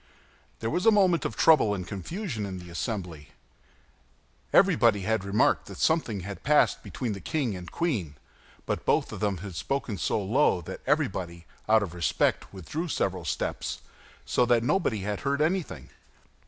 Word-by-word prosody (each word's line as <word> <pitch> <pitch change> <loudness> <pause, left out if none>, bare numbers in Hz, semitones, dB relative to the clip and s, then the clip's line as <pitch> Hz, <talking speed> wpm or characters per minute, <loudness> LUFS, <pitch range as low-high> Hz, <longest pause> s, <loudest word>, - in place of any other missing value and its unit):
There 115 0 -1
was 180 +5 0
a - - +9
moment 185 -4 +3
of - - -3
trouble 135 -10 +5
and 90 -2 -5
confusion 125 - -4
in 95 -2 -5
the 90 -1 -10
assembly. 85 -5 -5 1.2
Everybody 110 -3 +4
had 110 0 0
remarked 100 +2 +2
that - - -9
something 125 - +1
had 100 +2 -7
passed 150 +1 +3
between 120 -5 -4
the 100 - -6
king 135 -10 -1
and 90 -1 -8
queen; 110 - -2 0.5
but - - -2
both - - +1
of - - -6
them 100 -3 0
had 95 - -7
spoken 110 +3 -3
so - - 0
low 105 +2 +2
that 80 - -8
everybody, 85 -2 -1 0.2
out 110 -1 +5
of 90 -4 -6
respect, 85 -4 0
withdrew 100 - -5
several 95 - -1
steps, - - -3 0.4
so - - +2
that 120 -1 +3
nobody 120 - +1
had 105 +1 -3
heard 140 +1 -1
anything. 170 +3 -1
105 Hz, 165 wpm, -27 LUFS, 95-140 Hz, 1.2 s, a